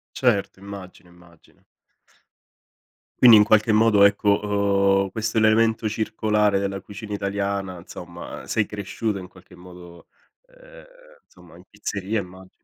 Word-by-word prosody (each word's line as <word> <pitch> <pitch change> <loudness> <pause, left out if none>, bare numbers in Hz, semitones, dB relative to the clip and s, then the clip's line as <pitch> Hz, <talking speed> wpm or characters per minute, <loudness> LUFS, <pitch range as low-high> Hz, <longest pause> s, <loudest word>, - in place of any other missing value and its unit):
Certo. 105 -7 0
Immagino, 95 -2 -11
immagino. 85 -2 -23 1.6
Quindi, 120 -3 +9
in 105 - +6
qualche 110 +1 +3
modo, 105 -2 +4
ecco, 100 -1 +2
uhm, - - -10
questo 110 +3 -2
è - - +1
l'elemento 110 0 +2
circolare 105 -2 0
della 100 0 -4
cucina 105 +1 -8
italiana, 100 -2 -3
insomma, - - -10
uhm, - - -13
sei 105 -3 -1
cresciuto, 105 +1 -4
in 90 - -8
qualche 90 0 -18
modo, 90 -1 -14 0.4
ehm, - - -17 0.4
insomma, - - -19
in - - -16
pizzeria, 100 +2 -4
immagino. 95 0 -13
100 Hz, 135 wpm, -23 LUFS, 95-110 Hz, 1.6 s, Quindi